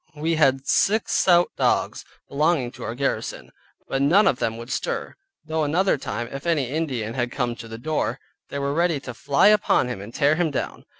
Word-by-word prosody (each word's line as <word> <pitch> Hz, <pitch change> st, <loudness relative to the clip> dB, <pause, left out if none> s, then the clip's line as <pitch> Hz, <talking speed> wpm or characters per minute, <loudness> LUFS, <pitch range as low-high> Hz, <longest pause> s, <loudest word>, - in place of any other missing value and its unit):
We 160 Hz, +3 st, -1 dB
had 135 Hz, -4 st, +2 dB
six 215 Hz, +2 st, +2 dB
stout 175 Hz, -1 st, +4 dB
dogs -, -, 0 dB, 0.2 s
belonging 145 Hz, -3 st, +1 dB
to -, -, -14 dB
our 115 Hz, -, -4 dB
garrison, 140 Hz, +2 st, -3 dB, 0.4 s
but 135 Hz, -, -1 dB
none 180 Hz, +9 st, +5 dB
of 125 Hz, -, +2 dB
them 115 Hz, 0 st, -1 dB
would 115 Hz, +3 st, -8 dB
stir, -, -, -3 dB, 0.3 s
though 160 Hz, 0 st, -1 dB
another 175 Hz, +6 st, +2 dB
time, 120 Hz, -4 st, -4 dB
if 140 Hz, +4 st, -6 dB
any 145 Hz, -7 st, +1 dB
Indian 130 Hz, -8 st, -2 dB
had 120 Hz, -1 st, -2 dB
come 120 Hz, -1 st, -2 dB
to 115 Hz, -, -9 dB
the 115 Hz, 0 st, -8 dB
door, 155 Hz, +6 st, -2 dB, 0.3 s
they -, -, -5 dB
were 140 Hz, 0 st, -1 dB
ready 170 Hz, -1 st, +1 dB
to 130 Hz, -2 st, -8 dB
fly 140 Hz, -, +3 dB
upon 205 Hz, -11 st, +3 dB
him 105 Hz, -6 st, -5 dB
and 105 Hz, +3 st, -9 dB
tear 145 Hz, +4 st, +2 dB
him 175 Hz, -2 st, +1 dB
down. 140 Hz, -, -4 dB
140 Hz, 200 wpm, -23 LUFS, 125-160 Hz, 0.4 s, none